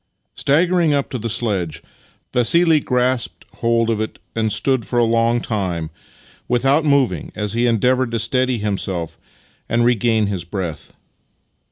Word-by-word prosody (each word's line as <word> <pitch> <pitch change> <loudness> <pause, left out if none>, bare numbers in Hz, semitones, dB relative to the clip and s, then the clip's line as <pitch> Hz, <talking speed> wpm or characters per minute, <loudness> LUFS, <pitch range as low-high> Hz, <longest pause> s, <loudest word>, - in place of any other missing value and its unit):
IX - - -7
Staggering 170 +2 +3
up 140 - -2
to 125 - -3
the 115 +1 -3
sledge, 100 -8 -2 0.5
Vassili 160 +6 +4
grasped 125 -2 -1
hold 115 0 +1
of 110 -1 -1
it 110 - -4 0.2
and 110 -1 0
stood 120 +3 +1
for 120 - -3
a 120 - +4
long 115 +1 +2
time 90 -10 -3 0.6
without 135 +5 +3
moving 135 - +1
as 105 -1 -3
he 120 +1 +1
endeavoured 125 +2 +2
to 115 - -2
steady 130 +2 +1
himself 95 -5 -3 0.5
and 120 +2 +2
regain 115 -2 +2
his 100 -4 -3
breath. 85 -4 -5
115 Hz, 150 wpm, -19 LUFS, 105-130 Hz, 0.6 s, Vassili